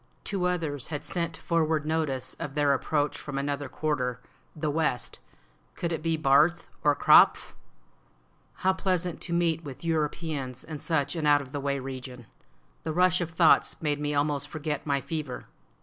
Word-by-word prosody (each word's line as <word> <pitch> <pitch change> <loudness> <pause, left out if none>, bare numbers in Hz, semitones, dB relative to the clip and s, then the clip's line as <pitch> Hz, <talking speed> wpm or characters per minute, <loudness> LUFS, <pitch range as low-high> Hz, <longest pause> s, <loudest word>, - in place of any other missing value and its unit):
Two 195 -3 -1
others 160 -7 -2
had 150 -2 -5
sent 170 -2 +1
forward 160 -2 0
notice 150 -5 -1
of 150 -4 -5
their 145 -2 +3
approach 145 +2 -1
from 145 -2 -6
another 140 0 -2
quarter 130 -5 -2 0.4
(the 155 -1 -2
west); 145 -6 -1 0.6
could 170 - -3
it 160 - -2
be 165 0 0
Barth 155 +4 +3 0.2
or 145 -1 +4
Krapf? - - +5 1.1
How 190 - +5
pleasant 180 -2 -1
to 170 - -3
meet 170 -1 +1
with 140 -1 -9
Europeans 150 -5 -2
in 155 -2 -7
such 145 -2 +2
an 155 -3 -1
out 145 0 +6
of 135 -2 -9
the 145 - -3
way 140 0 -1
region! 130 -2 -7 0.6
The 160 - -3
rush 180 +1 +3
of 170 - -2
thoughts 165 0 +4
made 145 -2 -1
me 150 0 -2
almost 145 -1 0
forget 150 -1 -4
my 140 -1 +1
fever. 150 -5 -5
150 Hz, 165 wpm, -27 LUFS, 140-165 Hz, 1.1 s, out